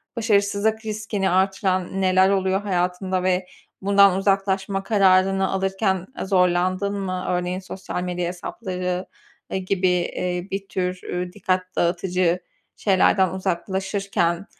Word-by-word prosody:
başarısızlık 215 0 +1
riskini 210 -2 -2
arttıran 190 0 0
neler 185 0 +4
oluyor 190 0 +1
hayatında 185 -1 -1
ve 185 0 +1 0.4
bundan 200 -1 +5
uzaklaşma 195 0 0
kararını 195 -2 +3
alırken, 190 -1 0
eee, - - -2
zorlandın 185 +1 +2
mı? 185 -1 -3
Örneğin, 180 +1 -1
sosyal 185 -1 -6
medya 180 -1 -2
hesapları, 180 0 -4 0.5
eee, - - 0
gibi, 185 0 0
eee, 180 0 -1
bir 195 0 -4
tür, 180 -1 -2
eee, 180 0 -4
dikkat 185 -2 0
dağıtıcı 175 0 +1 0.4
şeylerden 190 -1 +3
uzaklaşırken, 190 0 -1
190 Hz, 115 wpm, -23 LUFS, 180-195 Hz, 0.5 s, bundan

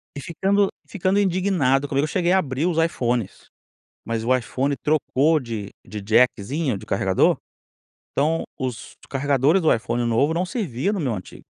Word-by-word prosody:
E 140 - -5
ficando 195 +6 +1 0.2
ficando 195 +1 0
indignado 175 -8 +2
comigo, 140 +1 0
eu - - -4
cheguei 175 +1 0
a 190 - +5
abrir 140 -1 -2
os 175 -3 0
iPhones, 120 - -2 0.6
mas 115 0 -2
o 130 +2 +3
iPhone 130 +3 -1
trocou 150 +1 +2
de 110 -5 -5 0.2
de 105 +1 -7
jackzinho, 120 +4 +1
de - - -11
carregador, 95 -1 +2 0.8
então 160 +4 +1
os 130 -3 -5 0.2
carregadores 140 +5 +2
do 160 - +4
iPhone 120 +1 -1
novo 130 +7 +2
não 175 +2 0
servia 185 - -2
no 200 - -2
meu 130 -7 -1
antigo. 95 -3 -9
140 Hz, 160 wpm, -23 LUFS, 120-170 Hz, 0.8 s, a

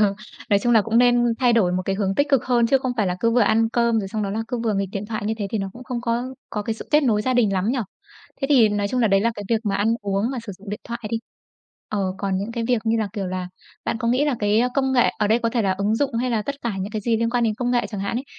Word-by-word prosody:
Ờ, 200 -2 +3 0.4
nói 200 - +5
chung 240 +4 +1
là 220 -2 +6
cũng 225 +2 +1
nên 245 0 +5 0.2
thay 245 -2 +3
đổi 200 -6 +3
một 185 +1 0
cái 195 - -1
hướng 195 -1 0
tích 285 +1 +1
cực 275 -4 +2
hơn 240 -2 +3
chứ 270 +3 +3
không 255 -1 -2
phải 210 -4 +1
là 180 0 -1
cứ 230 - +3
vừa 240 +1 +3
ăn 225 +1 +3
cơm 235 0 +2
rồi 195 -3 -3
xong 215 +1 -3
đó 200 - -2
là 220 +3 -2
cứ 245 - -2
vừa 220 - +1
nghịch 195 0 -1
điện 200 +1 -4
thoại, 215 -1 -4
như 220 - 0
thế 205 - -2
thì 220 - -1
nó 195 -1 -3
cũng 245 +4 -11
không 250 -2 -4
có 235 0 -1 0.3
có 210 - -3
cái 220 +2 -2
sự - - -10
kết 300 +1 +4
nối 220 -6 +2
gia 255 +3 0
đình 225 -5 +3
lắm 190 +2 0
nhỉ? 260 - -1 0.6
Thế 275 - 0
thì 245 -6 +6
nói 205 -1 -1
chung 250 +4 0
là 225 - +3
đấy 195 0 +4
là 230 +3 +2
cái 205 - -7
việc 225 -2 +2
mà 200 -2 0
ăn 215 +3 +2
uống 200 +3 0
mà 265 - -3
sử 200 - -5
dụng 200 0 -10
điện 210 - -5
thoại 235 0 -5
đi, 230 - 0 0.7
ờ, 210 - -2 0.2
còn 195 -2 -1
những 205 +4 -4
cái 230 -1 -2
việc 245 - +3
như 225 +1 +2
là, 215 -2 -1
kiểu 200 -4 -3
là, 185 0 -4 0.4
bạn 225 - -1
có 230 - -1
nghĩ 255 +4 +2
là 290 -3 +1
cái 210 +2 +2
công 265 -1 +1
nghệ, 245 -2 +4
ở 210 - +2
đây 220 +3 +3
có 235 -1 0
thể 235 -1 0
là 195 - +2
ứng 200 +3 0
dụng 275 -1 -1
hay 245 +2 0
là 225 -3 0
tất 280 - -3
cả 235 - -1
những 195 +3 -4
cái 215 - -2
gì 225 +2 +1
liên 230 +1 0
quan 240 -1 +1
đến 220 -2 +1
công 245 +2 -2
nghệ 245 -1 +1
chẳng 205 -3 -5
hạn 200 +4 -2
ấy, 255 - -3
225 Hz, 335 wpm, -22 LUFS, 205-240 Hz, 0.7 s, là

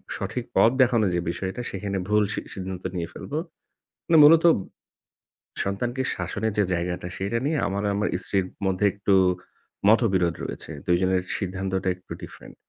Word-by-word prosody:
সঠিক 125 -2 -4
পথ - - +6
দেখানোর 115 -6 +3
যে - - +1
বিষয়টা 95 +6 -4
সেখানে 100 0 -3
ভুল 105 0 +3
সি - - -2
সিদ্ধান্ত 95 -1 -6
নিয়ে 85 -1 -2
ফেলব। - - -9 0.8
মানে 165 -2 +5
মূলত 165 +2 +7 1.2
সন্তানকে 120 +6 -2
শাসনের 100 +4 -2
যে 105 - +4
জায়গাটা 90 0 -2
সেটা 100 +5 -1
নিয়ে 155 +2 +1
আমার 100 +1 -2
আমার 105 +1 0 0.2
স্ত্রীর 95 +2 +1 0.2
মধ্যে 95 +2 +1
একটু 100 0 0 0.8
মতবিরোধ 95 -7 +3
রয়েছে। - - -6
২ 90 - +3
জনের 95 0 +2
সিদ্ধান্তটা 95 -1 -2
একটু 90 - -22
different। - - -11
100 Hz, 145 wpm, -25 LUFS, 95-110 Hz, 1.2 s, মূলত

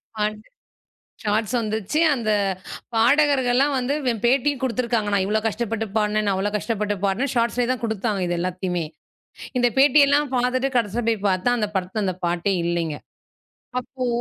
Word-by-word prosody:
பாட் 210 0 -1 0.8
shorts 215 +2 0
வந்துச்சு. 220 +5 -2
அந்தப் 205 -6 0 0.4
பாடகர்கள்லாம் 270 +2 +3
வந்து, 255 +2 -1
வே 245 - +2
பேட்டியும் 270 +2 +2
குடுத்திருக்காங்க. 235 -3 0
நான் 195 -1 +2
இவ்ளோ 210 +2 +1
கஷ்டப்பட்டு 225 0 -2
பாடுனேன், 210 0 +1
நான் 195 - +2
அவ்ளோ 195 +2 -1
கஷ்டப்பட்டு 210 -1 -2
பாடுனேன். 230 +8 0
ஷார்ட்ஸ்லே 235 +1 +1
தான் 255 - -3
குடுத்தாங்க, 220 -2 -1
இது 175 - -1
எல்லாத்தயுமே. 180 -1 -2 0.7
இந்தப் 245 -2 +2
பேட்டி 290 +2 +6
எல்லாம் 285 -1 +2
பாத்துட்டு, 255 +2 +1
கடைசியா 230 +1 0
போய்ப் 215 -3 -1
பாத்தா, 185 +4 +1
அந்தப் 210 -2 -3
படத்துல 190 +3 -1
அந்தப் 185 -1 -4
பாட்டே 175 +3 0
இல்லைங்க. 170 -3 -1 0.8
அப்போ! 255 0 -5
220 Hz, 150 wpm, -23 LUFS, 200-250 Hz, 0.8 s, பேட்டி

